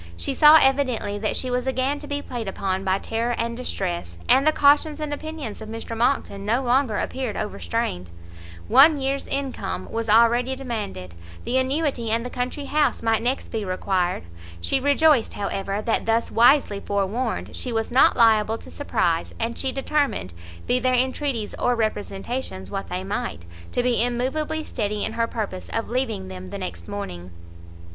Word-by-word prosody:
She 85 - -2
saw 300 +1 +8
evidently 260 -7 +1
that 215 - -1
she 255 - -1
was 250 +1 -1
again 265 +2 0
to 295 - -8
be 285 0 -3
played 235 -4 -5
upon 190 0 -2
by 190 0 +2
terror 230 +4 -2
and 235 0 -2
distress, 175 - -4
and 275 +3 +4
the - - +7
cautions 295 +1 +3
and 300 -1 -3
opinions 295 -8 -6
of 220 - -8
Mr 225 +1 -6
Monckton 230 -4 0
no 235 +6 +1
longer 245 -3 +2
appeared 255 -5 -3
overstrained; 210 - -3 0.6
one 295 +3 +7
year's 275 0 -2
income 275 -2 -3
was 230 -1 -2
already 235 +4 +4
demanded, 210 - -5 0.3
the 260 - +1
annuity 260 -3 0
and 230 +2 0
the 250 - -5
country 250 +3 -3
house 295 -4 +1
might 225 -1 +2
next 250 +3 -1
be 220 -2 -2
required; 185 - -1 0.4
she 85 - 0
rejoiced, 285 -2 +3
however, 200 0 -3
that 225 - 0
thus 225 +1 +1
wisely 235 -3 +4
forewarned, 205 +5 -2
she 250 - -2
was 225 0 -1
not 255 +1 +5
liable 225 -1 +4
to - - -13
surprise, 170 - -1
and 230 +1 -3
she 265 - -1
determined, 270 - -1 0.3
be 250 - +2
their 255 0 +2
entreaties 255 -3 -1
or 245 - +2
representations 215 - -3
what 195 0 -4
they 180 +1 -3
might, 190 - -4 0.3
to 245 - 0
be 245 -2 +2
immovably 270 +6 -1
steady 210 -6 -2
in - - -4
her 230 0 0
purpose 210 -5 -5
of 225 - -3
leaving 235 - -1
them 95 0 -8
the - - -6
next 85 -1 -7
morning. 90 -3 -6
235 Hz, 170 wpm, -24 LUFS, 205-265 Hz, 0.6 s, saw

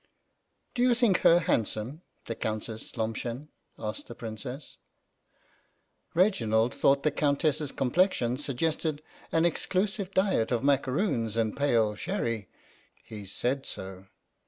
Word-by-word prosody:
" - - -48
Do 245 - -1
you 250 -1 +5
think 230 -7 +3
her 170 +1 +6
handsome, 115 - -1 0.2
the 115 - -3
Countess 110 +1 -4
Lomshen? 115 +5 -3
" - - -49
asked 110 0 -5
the 120 - -9
Princess. 125 +5 -7 1.4
Reginald 120 - +3
thought 140 0 +3
the 150 - +3
Countess's 145 0 +1
com 130 -2 -1
plexion 135 -9 +2
suggested 150 +2 -1 0.3
an 165 +1 +3
exclusive 195 +3 0
diet 190 - +2
of 120 0 +1
macaroons 130 - +1
and 110 -2 +1
pale 115 -7 +2
sherry. 115 - -3 0.5
He 105 -3 -10
said 130 +7 -1
so. 95 0 -7
135 Hz, 130 wpm, -29 LUFS, 110-165 Hz, 1.4 s, her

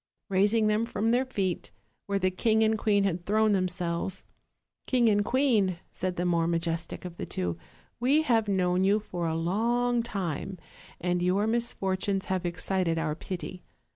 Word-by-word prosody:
Raising 205 +3 +3
them 215 +2 +2
from 225 -1 0
their 250 +2 +2
feet, 190 -8 -2 0.4
where 200 0 0
the 185 -1 +1
king 220 +4 +2
and 220 0 +3
queen 205 -2 +2
had 180 -3 -1
thrown 215 +3 +2
themselves: 180 -1 -1 0.6
'King 245 -3 +3
and 205 -1 +3
queen,' 220 -8 +2
said 185 -1 -3
the 175 - -1
more 170 -2 +2
majestic 170 0 -2
of 175 -1 -7
the - - -4
two, 90 -2 -2 0.4
'we 275 +6 +3
have 230 -7 +2
known 185 -2 +2
you 200 +2 +3
for 175 -5 -4
a 160 - -1
long 235 +8 +1
time; 190 -4 -4 0.4
and 180 0 0
your 185 +4 +2
misfortunes 200 -4 0
have 185 -1 -1
excited 175 0 -1
our 160 -2 0
pity. 180 +2 -6
190 Hz, 165 wpm, -28 LUFS, 175-220 Hz, 0.6 s, Raising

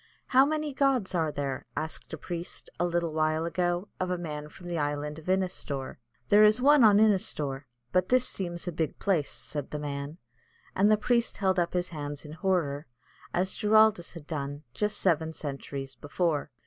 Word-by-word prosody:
"How 265 +2 +6
many 305 -1 -1
gods 265 -8 +1
are 160 -3 +1
there?" 140 -1 -4
asked 160 0 -4
a 160 - -4
priest, 170 +2 -6
a 175 - +2
little 170 -2 -1
while 155 +1 +1
ago, 175 +2 0
of 185 - -1
a 180 - 0
man 150 -3 -5
from 175 +3 -12
the 170 -2 -2
Island 145 +1 -2
of 160 - -15
Innistor. 180 -8 -1 0.3
"There 210 +1 +7
is 215 +2 +6
one 285 +1 +6
on 210 -2 +7
Innistor; 155 -10 +2 0.3
but 185 0 +2
this 255 0 +3
seems 175 -2 -4
a - - 0
big 160 -2 -2
place," 175 -8 +1
said 145 -2 -5
the 150 - -4
man, 145 +1 -5 0.6
and 200 +3 +4
the 215 - +5
priest 235 +2 +1
held 190 -2 +2
up 170 -1 0
his 180 0 0
hands 145 -2 -6
in 150 - -9
horror, 160 -5 -1 0.4
as 185 +2 0
Giraldus 215 -4 +4
had, 145 -3 -5
just 210 0 -1
seven 160 -3 +1
centuries 135 -2 -5
before. 145 +4 -1
170 Hz, 180 wpm, -29 LUFS, 150-195 Hz, 0.6 s, There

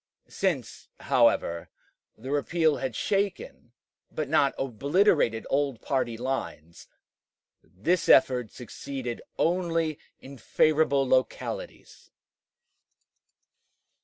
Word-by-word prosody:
Since, - - -3
however, 85 0 +2 0.5
the 130 +5 -7
repeal 155 +1 +1
had 130 -3 -4
shaken 205 - -2 0.4
but 155 -2 -3
not 140 0 +2
obliterated 135 - +1
old 140 -4 0
party 125 -4 -2
lines, 115 - -5 0.7
this 165 - -1
effort 125 -4 +5
succeeded 125 +1 -7 0.2
only 165 -3 0 0.2
in 135 -1 -12
favorable 145 +1 +2
localities. 130 0 -3
135 Hz, 80 wpm, -27 LUFS, 125-155 Hz, 0.7 s, effort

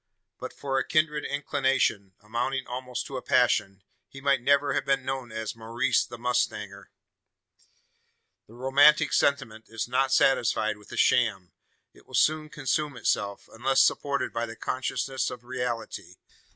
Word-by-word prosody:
But - - -6
for 135 -1 -2
a - - 0
kindred 155 -1 +1
inclination 135 -9 0
amounting 125 +5 -2
almost 125 0 -5
to 135 - -6
a - - -5
passion 105 -8 +1 0.3
he 135 - -11
might 135 -2 +2
never 140 +2 +3
have - - 0
been 135 -2 0
known 130 -3 -4
as 110 0 -5
Maurice 115 +4 0
the 120 - -9
mustanger. 105 -5 -2 1.6
The 115 - -16
romantic 140 +4 +4
sentiment 120 -6 0
is 115 0 -4
not 130 +2 +1
satisfied 110 -6 +2
with 105 - -17
a - - -7
"sham." 105 -7 +2 0.4
It - - -21
will - - -7
soon 155 0 +2
consume 145 -2 -2
itself, 100 -3 -1
unless 130 +3 +3
supported 140 -1 0
by 115 0 -2
the 115 - -8
consciousness 130 +2 -2
of 125 -1 -9
reality. 125 -2 -5
125 Hz, 150 wpm, -27 LUFS, 115-135 Hz, 1.6 s, romantic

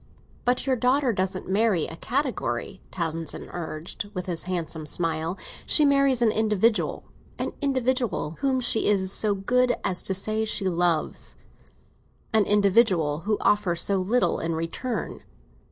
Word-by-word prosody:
"But 245 +1 +1
your 265 -2 +2
daughter 255 +1 +2
doesn't 185 -1 -2
marry 200 -3 +2
a 165 - -7
category," 260 - -3
Townsend 165 -3 -4
urged, 170 +3 -6
with 180 - -3
his 170 -3 0
handsome 165 -4 -4
smile. 165 +2 0 0.3
"She 300 - +5
marries 275 -3 +3
an 220 - +4
individual—an 215 0 -1
individual 255 - 0
whom 265 -2 +1
she 225 -2 +2
is 190 -2 +2
so 205 0 +1
good 245 +5 +2
as 180 - 0
to 190 - 0
say 215 +3 +1
she 215 -3 0
loves." 175 -3 0 1.0
"An 215 -2 +4
individual 195 -7 +3
who 210 0 +1
offers 185 -5 +2
so 200 - +1
little 210 +7 +1
in 165 0 -2
return!" 165 +10 -4
200 Hz, 135 wpm, -25 LUFS, 175-240 Hz, 1.0 s, She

